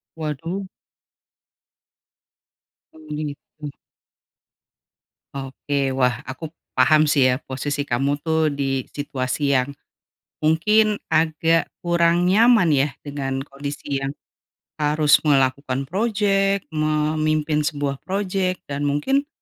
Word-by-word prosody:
Waduh! 165 +5 -4 2.3
Oh, 160 - -16
gitu. 150 0 -6 1.6
Oke. 135 0 -2
Wah, 125 -2 0
aku 150 +4 -7 0.2
paham 155 +4 +5
sih 140 -3 +4
ya 125 - +1
posisi 140 +2 -3
kamu 140 +3 0
tuh 160 -1 +2
di 135 -2 -1
situasi 140 0 -2
yang, 130 +1 +2 0.7
mungkin 210 +7 +2
agak 160 +1 +2 0.2
kurang 170 0 +2
nyaman 220 -2 +5
ya 140 -2 +2
dengan 135 -2 -3
kondisi 140 0 -5
yang 135 +1 -3 0.7
harus 150 0 +4
melakukan 135 -2 +1
project, 195 - +1
memimpin 155 0 +1
sebuah 145 -2 -2
project, 190 -1 -2
dan 140 0 -5
mungkin 270 - 0
150 Hz, 95 wpm, -22 LUFS, 140-170 Hz, 2.3 s, paham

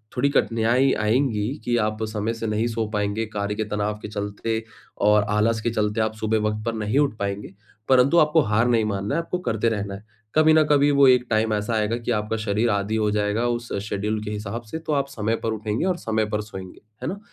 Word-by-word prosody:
थोड़ी 140 +3 +2
कठिनाई 120 0 +2
आएँगी 110 -1 +1 0.2
कि 120 - +1
आप 110 +1 -2
समय 110 +1 -2
से 115 -1 -4
नहीं 110 +2 0
सो 115 -1 -2
पाएँगे 105 +2 -1
कार्य 105 -1 -3
के 110 - -1
तनाव 105 0 -1
के - - -6
चलते 105 +2 -3 0.4
और 105 0 +5
आलस 110 +1 +1
के 120 - 0
चलते, 105 0 0
आप 110 0 0
सुबह 110 0 0
वक़्त 105 0 -4
पर 115 - -1
नहीं 110 +5 0
उठ 140 -6 +2
पाएँगे, 100 0 -4 0.4
परंतु 130 +5 +5
आपको 155 +1 +4
हार 110 0 +2
नहीं 115 -3 +2
मानना 100 +5 -2
है, 165 - +1
आपको 180 +2 -3
करते 110 +1 +1
रहना 100 -2 -3
है। 100 - -11 0.3
कभी 155 0 +6
न 155 0 +6
कभी 145 0 +4
वो 140 -1 +6
एक 125 -1 +5
टाइम 110 0 +1
ऐसा 105 +2 -1
आएगा 110 +1 +1
कि 120 0 -3
आपका 105 0 -1
शरीर 110 +2 +1
आदी 100 +2 -1
हो 105 -1 +1
जाएगा, 105 +3 0
उस 120 0 -3 0.2
शेड्यूल 105 +2 -2
के 105 - -4
हिसाब 105 +2 -4
से, 115 - -5
तो 160 -1 -3
आप 140 -1 +1
समय 115 -3 -1
पर 115 - 0
उठेंगे 110 - -2
और 185 -2 +1
समय 110 -5 -1
पर 105 0 -2
सोएँगे। 95 -3 -10 0.2
है - - -2
ना? 200 +2 -5
110 Hz, 230 wpm, -23 LUFS, 105-120 Hz, 0.4 s, कभी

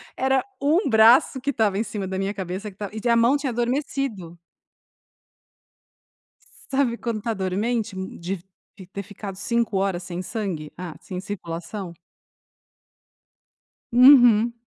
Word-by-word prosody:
Era 265 0 +2 0.2
1 305 +4 +2
braço 230 +4 +5
que 280 - -2
estava 220 -6 +1
em 215 - +1
cima 205 -4 -5
da 190 0 -4
minha 195 +1 -2
cabeça 190 +2 -5
que - - -22
estava 205 -2 -5
e 220 +2 -2
a 235 - +5
mão 235 +5 +4
tinha 285 -2 -1
adormecido. 240 - -3 2.3
Sabe 265 -4 +1
quando 230 -4 -3
tá 230 0 -2
dormente 210 +3 -2
m 190 0 -6
de 185 +2 -4 0.5
ter 200 - -4
ficado 200 0 -8
5 235 0 -1
horas 190 -2 -1
sem 180 -1 -5
sangue? 185 -7 -4
Ah, 175 -3 -7
sem 180 - -6
circulação? 185 0 -6 2.0
Uhum. 240 -3 +7
215 Hz, 135 wpm, -23 LUFS, 190-240 Hz, 2.3 s, Uhum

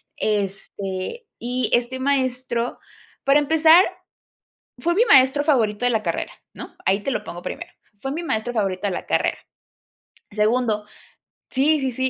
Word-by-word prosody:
este, 200 - -3
y 250 +2 -2
este 245 +2 +1
maestro, 255 -3 -1 0.5
para 275 +2 +5
empezar, 320 +4 +6 1.0
fue 345 +1 +1
mi 440 +7 +4
maestro 275 - +5
favorito 235 -6 +2
de 245 - +3
la 220 -2 0
carrera, - - -3 0.2
¿no?, - - -10
ahí 195 +2 +3
te 275 - -3
lo - - -2
pongo 175 - -8
primero, - - -6 0.3
fue 270 - -3
mi 325 +5 -3
maestro 225 -6 -1
favorito 195 -2 -1
de - - -1
la 180 - -4
carrera, - - +1 0.9
segundo, 215 0 +1 0.6
sí 295 +4 +3
sí 265 -2 -1
sí, 260 +2 -1
250 Hz, 150 wpm, -22 LUFS, 210-280 Hz, 1.0 s, empezar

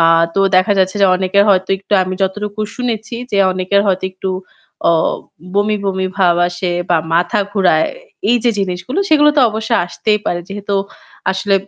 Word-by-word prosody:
আ - - +4 0.3
তো 195 - +2 0.2
দেখা 185 +3 +3
যাচ্ছে 190 +2 +1
যে - - +7
অনেকের 190 +2 +2
হয়তো 190 -1 +2
একটু 195 - -9
আমি 185 0 -3
যতটুকু 210 +2 -3 0.2
শুনেছি 235 -1 -3 0.2
যে 200 - 0
অনেকের 185 +2 +1
হয়তো 190 -1 0
একটু 190 0 -4 0.6
অ - - +4 0.6
বমি, 210 +1 +2
বমি 190 -1 -1
ভাব 180 -3 +3
আসে 175 +1 -3 0.2
বা 175 - +4 0.2
মাথা 180 +6 +1
ঘুরায়। 180 -6 +2 0.4
এই 245 - +4
যে 240 - +4
জিনিসগুলো 185 - -3
সেগুলো 300 -1 +5
তো - - +5
অবশ্যই 220 +2 -1
আসতেই 210 +4 0
পারে। 175 - -1
যেহেতু 200 0 -4 0.6
আসলে 190 +1 0
195 Hz, 170 wpm, -16 LUFS, 185-210 Hz, 0.6 s, যে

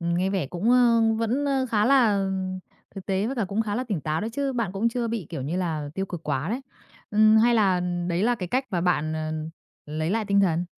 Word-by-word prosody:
nghe 170 +2 0
vẻ 190 -7 -1
cũng, 180 - -1
ơ, 240 -2 +5 0.2
vẫn, 235 +5 0
ơ, 270 -2 +1
khá 210 -2 +2
là 225 -7 +4 0.7
thực 195 -2 -8
tế 195 +1 0
với 265 +3 -3
cả 230 - 0
cũng 200 +4 -1
khá 210 -2 -3
là 250 - -2
tỉnh 205 -9 -3
táo 155 +2 -2
đó 220 - -3
chứ, 275 +2 -1
bạn 230 -7 -2
cũng 205 +4 +1
chưa 235 0 -2
bị, 225 -7 -3
kiểu 135 - -4
như 150 +7 -3
là, 160 -5 -2
tiêu 195 0 -2
cực 175 -3 -7
quá 145 +1 -2
đấy. 240 +6 -2 0.5
Ừm, 215 +1 +5
hay 235 +2 +4
là 195 -5 +3 0.3
đấy 175 +1 0
là 245 +3 +3
cái 185 -6 -5
cách 260 +7 0
mà 180 -4 0
bạn, 155 -3 +1
à, 155 0 -3 0.5
lấy 155 +2 -2
lại 220 +2 0
tinh 200 -1 +3
thần? 175 -2 +1
200 Hz, 245 wpm, -25 LUFS, 175-230 Hz, 0.7 s, ơ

